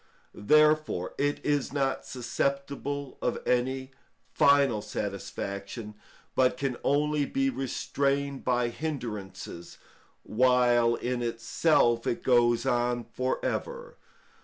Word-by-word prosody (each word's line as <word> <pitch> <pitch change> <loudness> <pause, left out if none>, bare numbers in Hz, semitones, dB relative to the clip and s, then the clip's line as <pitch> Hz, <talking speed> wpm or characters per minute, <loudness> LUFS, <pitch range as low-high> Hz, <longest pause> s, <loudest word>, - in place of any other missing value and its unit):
Therefore 155 - +3
it 145 0 +1
is 145 -3 0
not 135 -1 -1
susceptible 140 +2 -3
of 125 - 0
any 130 +2 0 0.4
final 140 -6 +4
satisfaction, 100 +2 -5 0.4
but 130 -1 +2
can 130 -2 -2
only 150 +1 +2
be 270 0 0
restrained 140 - -1
by 125 -1 +1
hindrances, 115 - -6 0.5
while 120 0 +3
in 125 0 -2
itself 120 +1 +1
it - - -1
goes 120 -1 +3
on 120 -1 +1
for 130 0 -1
ever. - - -4
130 Hz, 100 wpm, -28 LUFS, 120-140 Hz, 0.5 s, final